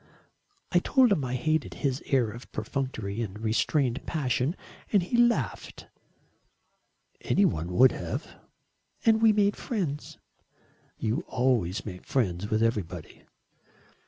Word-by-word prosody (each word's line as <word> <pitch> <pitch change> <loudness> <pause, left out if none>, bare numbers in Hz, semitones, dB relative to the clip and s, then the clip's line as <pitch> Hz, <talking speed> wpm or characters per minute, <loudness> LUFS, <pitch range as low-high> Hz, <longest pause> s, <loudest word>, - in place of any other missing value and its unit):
"I 175 - +5
told 255 +5 +4
him 155 -8 +2
I 130 0 -2
hated 155 +3 0
his 135 -2 -1
air 125 -5 +2
of 120 +3 -11
perfunctory 110 -3 -3
but 105 -1 -7
restrained 120 +4 0
passion, 140 0 0 0.4
and 200 -4 +4
he 185 - -2
laughed." 240 0 +1 1.4
"Any 200 - +3
one 85 - -1
would 130 +7 +6
have." - - -4 0.8
"And 220 -1 +4
we 225 -1 +7
made 205 -1 +2
friends." 170 - -4 0.8
"You 115 +10 -1
always 115 -6 0
make 90 -4 -7
friends 105 -6 -1
with 110 0 +2
everybody." 90 -7 -3
130 Hz, 125 wpm, -28 LUFS, 110-170 Hz, 1.4 s, we